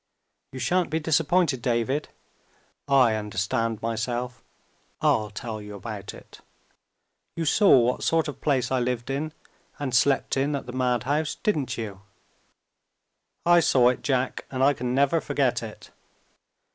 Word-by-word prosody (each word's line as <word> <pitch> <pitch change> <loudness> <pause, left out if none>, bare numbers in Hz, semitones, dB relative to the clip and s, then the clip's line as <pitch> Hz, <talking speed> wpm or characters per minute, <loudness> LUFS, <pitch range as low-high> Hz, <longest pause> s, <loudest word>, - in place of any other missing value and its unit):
You 130 - -8
shan't 170 +8 +1
be 160 - 0
disappointed, 160 -2 +2
David. 125 +5 -1 0.8
I 130 -5 +5
understand 110 +2 -2
myself 120 +2 -3 0.6
I'll 105 -1 +2
tell 110 +1 -6
you 105 0 -9
about 100 -1 -7
it. - - -15 1.0
You 165 - -2
saw 195 0 +5
what 125 +1 +1
sort 165 -1 +2
of 145 - -7
place 135 -5 +1
I 130 - +2
lived 125 0 -2
in 150 +3 -2 0.5
and 140 -3 -4
slept 135 +3 +2
in 140 +2 +1
at 140 - -5
the 125 - -8
madhouse, 130 +5 0
didn't 150 -11 -1
you?" 105 -4 -6 1.4
"I 175 0 +6
saw 130 -6 +4
it, 125 - -2
Jack 130 -2 -1
and 130 0 -1
I 140 +1 +5
can 125 -1 -3
never 140 +4 +3
forget 135 -4 0
it." 110 -2 -10
130 Hz, 145 wpm, -25 LUFS, 115-145 Hz, 1.4 s, I